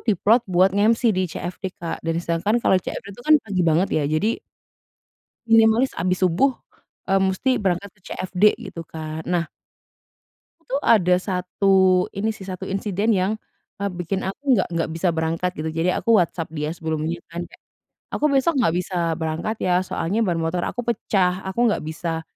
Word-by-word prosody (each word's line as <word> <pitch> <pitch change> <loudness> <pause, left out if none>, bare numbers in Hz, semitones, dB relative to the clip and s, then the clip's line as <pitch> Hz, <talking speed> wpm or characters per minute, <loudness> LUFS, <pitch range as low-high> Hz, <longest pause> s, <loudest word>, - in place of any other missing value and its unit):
di-plot 220 +4 +4
buat 185 +2 +4
nge-MC 220 +4 +3
di 185 - +1
CFD, 180 +3 -5
Kak, 170 -1 -5
dan 165 0 -1
sedangkan 170 +7 0
kalau - - +4
CFD 195 - -6
itu 220 - -13
kan 310 - +7
pagi 195 -4 -2
banget 170 +5 +3
ya, 150 - +1
jadi 175 +9 0 1.1
minimalis 225 +3 +5
habis 180 +2 0
subuh, 190 +10 +3 0.6
eee, 195 - +4
mesti 190 +7 +1
berangkat 195 0 -1
ke - - -30
CFD 185 +1 -1 0.3
gitu 165 -3 -8
kan. 155 0 -6
Nah 175 -1 +1 1.2
waktu - - -33
tuh 280 - +1
ada 180 -5 +5
1 190 +1 0 0.4
ini 215 +3 0
sih, 200 - -10
1 185 0 -5
insiden 200 +2 -1
yang, 185 +3 +1 0.5
eee, 200 - -1
bikin 180 +2 -3
aku 195 +9 -5
nggak - - 0
nggak 165 -1 -1
bisa 165 +3 0
berangkat 165 +3 0
gitu. 160 +1 -3
Jadi 165 +3 +1
aku 230 -2 +3
WhatsApp 165 -1 -2
dia 150 -1 -3
sebelumnya 160 +1 -2
kan 170 +1 -4
kayak, - - -19 0.5
"Aku - - 0
besok 280 +4 +2
nggak 220 -9 +2
bisa 180 0 -3 0.2
berangkat 160 +7 -2
ya, 180 0 +2
soalnya 185 +6 -2
ban 175 -3 0
motor 170 +2 -1
aku 245 - -3
pecah, 190 -5 0
aku 190 - -4
nggak 210 - -1
bisa." 160 +1 -3
185 Hz, 175 wpm, -22 LUFS, 165-205 Hz, 1.2 s, kan